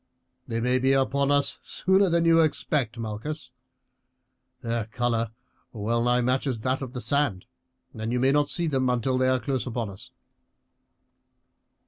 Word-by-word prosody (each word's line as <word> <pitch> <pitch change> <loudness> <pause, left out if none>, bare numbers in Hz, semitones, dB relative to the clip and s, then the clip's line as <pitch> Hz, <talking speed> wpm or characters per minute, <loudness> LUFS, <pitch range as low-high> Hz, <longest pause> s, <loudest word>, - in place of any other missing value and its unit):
"They 115 - -2
may 125 +2 +1
be 135 +1 +3
upon 135 +1 +1
us 145 0 +1
sooner 190 +1 +2
than 170 0 +2
you 165 0 +6
expect, 140 -5 0
Malchus. 115 +7 -5 1.1
Their 115 -1 -1
colour 115 0 -1 0.4
well 115 +2 -1
nigh 120 0 +3
matches 130 +1 0
with 110 - -12
that 130 +2 0
of 130 -2 -6
the 125 - -5
sand, 140 -11 0 0.5
and 110 0 -4
you 125 - 0
may 130 +2 +3
not 145 0 +2
see 175 - -1
them 135 -5 +1
until 125 +1 0
they 130 - +3
are 130 0 +2
close 130 -1 -2
upon 115 -4 -3
us." 95 - -12
130 Hz, 160 wpm, -26 LUFS, 115-140 Hz, 1.1 s, you